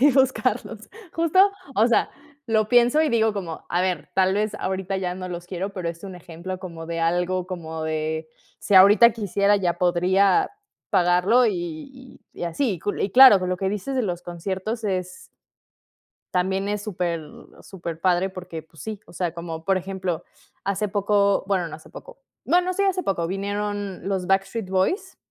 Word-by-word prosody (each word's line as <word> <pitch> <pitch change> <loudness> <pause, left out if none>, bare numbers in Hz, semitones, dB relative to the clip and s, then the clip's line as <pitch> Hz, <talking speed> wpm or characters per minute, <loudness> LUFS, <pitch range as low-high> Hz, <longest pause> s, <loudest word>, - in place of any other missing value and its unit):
buscarlos. 265 -1 0 0.2
Justo, 330 +2 +2 0.4
o 220 +3 +4
sea, 240 - +2 0.4
lo 220 -2 +2
pienso, 245 +5 +5
y 315 - +2
digo 225 -3 +2
como: 175 -6 -6
"A 175 - +1
ver, 180 -5 -2
tal 190 0 +3
vez 210 +1 0
ahorita 190 -1 -3
ya 180 -1 -3
no 185 0 -6
los 175 -1 -6
quiero" 190 +2 -4
Pero 180 -4 -3
es 170 +2 -9
un 190 -2 -7
ejemplo 175 +1 -7
como 170 -3 -8
de 165 0 -4
algo 175 +2 0
como 160 -3 -6
de, 155 0 -2 0.3
si 205 - +1
ahorita 205 +5 +8
quisiera, 205 -2 +1
ya 175 -3 -1
podría 185 - +3 0.4
pagarlo, 180 +8 +4
y 205 - -6
y - - -6
así. 200 +8 0
Y 175 - -7
cul 205 - -3
y 195 - -1
claro, 255 -5 +9
con 180 0 -2
lo 185 - -1
que 190 +1 -1
dices 210 +7 -3
de 255 - +2
los 175 -4 -3
conciertos 190 +6 -4
es, 185 -2 -4 1.0
también 190 +2 0
es 210 0 -2
súper 175 -5 -2 0.4
súper 170 -4 -7
padre, 185 +1 +2
porque, 180 -3 -8
pues 160 0 -16
sí, 215 -2 -5
o - - -15
sea, 175 -2 -2
como, 165 -1 -7
por 195 0 +2
ejemplo, 185 -2 -4 0.4
hace 200 +2 -1
poco 200 0 +2
bueno, 185 -4 0
no 155 - -7
hace 155 - -16
poco - - -12 0.3
no 350 - +4
no 365 +1 -2
sí, 400 - -1
hace 380 -2 +1
poco, 170 -4 -1
vinieron 200 +1 -3
los 190 -2 -1
Backstreet 195 +2 0
Boys 360 - 0
190 Hz, 180 wpm, -24 LUFS, 175-210 Hz, 1.0 s, claro